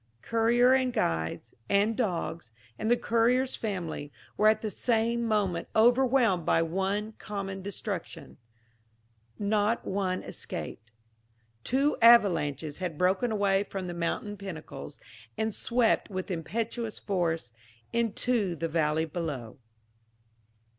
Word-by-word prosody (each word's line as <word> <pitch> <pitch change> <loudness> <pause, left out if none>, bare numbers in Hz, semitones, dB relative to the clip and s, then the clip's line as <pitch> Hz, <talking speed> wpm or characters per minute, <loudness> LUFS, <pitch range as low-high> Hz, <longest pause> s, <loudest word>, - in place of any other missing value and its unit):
Courier, 235 +2 +4
and 260 -1 +2
guides, 80 - -2 0.2
and 205 +3 +3
dogs, 170 - -2 0.3
and 220 - -1
the 240 - +4
courier's 245 +3 +2
family, 175 -8 -4 0.2
were 215 - +4
at 215 0 +3
the 215 - -2
same 235 +2 +1
moment 205 -7 0
overwhelmed 240 -4 +4
by 165 +1 +3
one 195 +5 -1
common 195 -2 -5
destruction 200 -2 -6 1.0
not 210 +2 +1
one 190 -1 -1
escaped. 110 +2 -6 0.7
Two 275 +4 +1
avalanches 165 - +4
had 175 -5 -3
broken 190 +7 +2
away 200 -2 +2
from 195 -2 -5
the 175 - -4
mountain 175 +5 -3
pinnacles, 170 -6 -8 0.4
and 220 -1 -1
swept 235 +1 +1
with 185 -1 -4
impetuous 225 +6 -3
force 165 - -1 0.4
into 230 -4 0
the 165 +1 -2
valley 160 0 +1
below. 145 -8 -5
200 Hz, 115 wpm, -29 LUFS, 170-230 Hz, 1.0 s, Courier